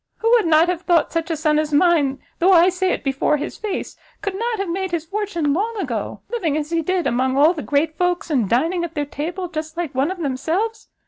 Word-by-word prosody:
Who 455 - +1
would 460 -7 +4
not 320 +1 +5
have 355 -1 -1
thought 345 -3 +2
such 330 0 -2
a 325 - 0
son 305 -1 +2
as 305 -1 -2
mine, 290 -3 +2 0.2
though 375 +3 +5
I 350 +1 +6
say 370 0 0
it - - -2
before 275 +2 +1
his 295 - -6
face, 420 -3 -4 0.3
could 400 - -2
not 460 +3 -2
have 395 -1 -2
made 375 +2 -2
his 340 -2 -3
fortune 345 -6 -1
long 435 +7 -1
ago, 250 - -4
living 340 -11 0
as 305 +1 -4
he 335 -1 +1
did, 365 +2 -1
among 260 +2 +1
all 305 +5 +5
the 315 - -5
great 310 +2 0
folks, 355 -2 0
and 240 -9 +1
dining 330 +9 +1
at 340 -1 -5
their 295 -1 -1
table 340 +6 -4
just 315 -1 -6
like 340 -5 -3
one 270 +4 +1
of 375 - -4
themselves? 340 - -2
335 Hz, 240 wpm, -21 LUFS, 295-370 Hz, 0.3 s, I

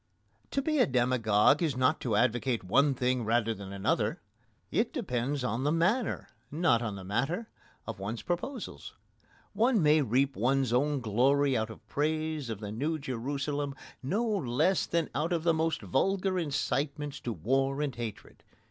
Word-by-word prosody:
To 275 - -1
be 310 0 +1
a - - +5
demagogue 120 0 +3
is 150 -7 0
not 130 0 +2
to 115 -5 0
advocate 120 +1 +1
one 140 +9 +3
thing 125 0 0
rather 115 0 +1
than 100 -2 -9
another. 100 -1 0 0.5
It - - +1
depends 125 +3 -2
on 120 +1 -1
the 145 - +2
manner, 185 +9 +1 0.2
not 140 -6 +2
on 110 -4 -3
the 95 - -8
matter, 135 - -2 0.4
of - - -6
one's 105 +4 -4
proposals. 205 +8 -4 0.6
One 235 0 +3
may 150 +1 +5
reap 135 +2 +1
one's 130 +1 +1
own 140 +2 +1
glory 130 +5 +2
out 110 -1 0
of - - -12
praise 155 -2 -1
of 110 -2 -5
the 105 -1 -5
New 150 +9 -1
Jerusalem 140 +1 -3 0.3
no 200 - 0
less 175 - +1
than 165 -2 0
out 155 +7 -1
of 170 -2 0
the 170 -1 +3
most 160 -5 0
vulgar 190 - +1
incitements 145 -1 -2
to 120 - -4
war 135 - 0
and 145 -3 -1
hatred. 115 -4 -7
135 Hz, 165 wpm, -30 LUFS, 120-155 Hz, 0.6 s, a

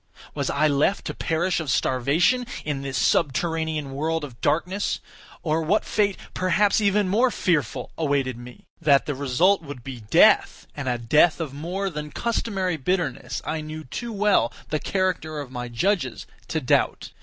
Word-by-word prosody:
Was - - -2
I 155 +2 +2
left 150 +7 +1
to - - -3
perish 170 +2 0
of 160 -4 -4
starvation 150 - +2 0.2
in 145 -3 -2
this 135 -1 -3
subterranean 160 -1 0
world 160 +3 -1
of 130 -5 -9
darkness; 185 +5 0 0.4
or 160 0 +1
what 180 +7 +1
fate, 200 -2 +1 0.2
perhaps 195 +4 +2
even 205 -1 +2
more 230 +7 +3
fearful, 165 - -1
awaited 140 -5 0
me? 120 +1 -12 0.2
That 140 -4 +4
the 145 - -2
result 145 +8 +2
would 145 -6 -9
be 130 -2 -7
death, 105 -1 +4
and 140 -3 -3
a 120 - 0
death 150 +9 +3
of 155 -5 -4
more 175 +7 -3
than 150 -1 -5
customary 195 -3 -1
bitterness, 150 -3 -2
I 160 0 -2
knew 155 +1 -7
too 235 - -6
well 205 - +2 0.2
the 155 - 0
character 180 -5 -1
of 140 -3 -7
my 125 -1 -5
judges 130 - -1 0.2
to 160 - -1
doubt. 140 0 +1
155 Hz, 165 wpm, -24 LUFS, 140-185 Hz, 0.4 s, That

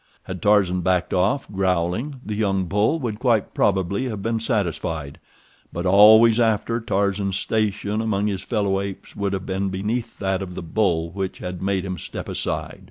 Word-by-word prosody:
Had 95 -1 -7
Tarzan 100 -3 +3
backed 90 0 0
off, 100 +10 +1
growling, 95 - -1
the 105 - -3
young 100 -3 0
bull 105 - +1
would 115 -8 -4
quite 120 -5 +1
probably 100 +4 +1
have 105 -6 -4
been 115 0 0
satisfied, 85 - -2 0.5
but 85 +2 -4
always 110 +4 +7
after 115 0 +1
Tarzan's 100 -2 0
station 105 0 -1
among 105 -2 0
his 100 -3 -1
fellow 100 -4 0
apes 100 -1 -7
would 100 -1 -2
have 95 -1 -3
been 95 +1 -1
beneath 110 +5 -3
that 95 -1 -1
of 90 -2 -6
the - - -5
bull 85 -2 0
which 95 0 -4
had 90 -1 -6
made 95 -1 -1
him 95 -2 -4
step - - -7
aside. - - -3
100 Hz, 170 wpm, -23 LUFS, 95-110 Hz, 0.5 s, always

